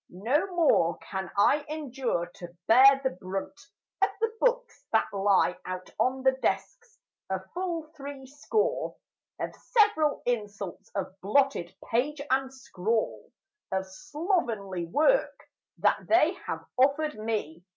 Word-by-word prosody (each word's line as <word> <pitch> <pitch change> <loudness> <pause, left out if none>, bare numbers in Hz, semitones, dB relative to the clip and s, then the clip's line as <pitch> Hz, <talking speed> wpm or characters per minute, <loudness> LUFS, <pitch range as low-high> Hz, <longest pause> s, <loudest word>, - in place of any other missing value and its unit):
No 240 - 0
more 170 - +3
can 190 -2 -5
I 285 +8 +4
endure 270 - -2
to 175 0 -12
bear 270 +4 +7
the 265 - +1
brunt 190 +9 -6 0.4
Of 395 - +5
the 450 0 0
books - - 0
that - - +2
lie 195 -2 +2
out 185 0 -6
on 260 +1 +1
the 265 - +6
desks: 455 - -3 0.3
a 190 0 -1
full 345 -2 -2
three 280 -2 -8
score 425 - -1 0.4
Of - - -3
several 415 -10 +2
insults 205 -5 -3
of 195 -2 -3
blotted 210 -4 +1
page 275 +6 0
and 265 0 +1
scrawl 225 -4 -2 0.4
Of 190 0 -1
slovenly 225 - -2
work 310 - +2 0.4
that - - +1
they 335 0 +4
have - - -4
offered 285 0 +2
me. 210 -7 -3
260 Hz, 130 wpm, -28 LUFS, 195-305 Hz, 0.4 s, bear